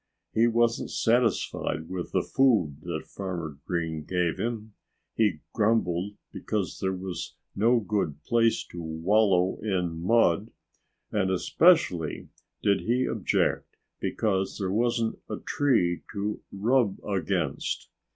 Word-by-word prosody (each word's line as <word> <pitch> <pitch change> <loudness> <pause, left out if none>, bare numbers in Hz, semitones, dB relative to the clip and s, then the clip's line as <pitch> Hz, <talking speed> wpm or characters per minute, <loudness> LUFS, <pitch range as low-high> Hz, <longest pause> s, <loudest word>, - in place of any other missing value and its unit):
He 115 +2 +4
wasn't 120 0 +1
satisfied 115 -8 +1
with 90 -1 -5
the - - +1
food 105 - +2
that - - -4
Farmer 85 -7 -5
Green 80 -3 -2
gave 90 0 -1
him, 110 -2 -3 0.4
he 105 -9 +1
grumbled 105 -4 +1 0.2
because 105 -4 -3
there 95 - 0
was 90 -1 -5 0.2
no 115 +4 +4
good 95 -9 -2
place 115 +3 +2
to 85 - -6
wallow 90 +3 +2
in 90 -6 -1
mud, 110 0 +3 0.6
and 95 -3 +1
especially 95 - +3 0.3
did 100 -1 +3
he 125 +3 +1
object - - 0 0.2
because 95 -3 -1
there 95 -3 -2
wasn't 115 +1 0
a - - -3
tree 110 -12 +1
to 105 +1 -3
rub 110 0 +2
against. 95 -7 -1
100 Hz, 120 wpm, -27 LUFS, 85-115 Hz, 0.6 s, He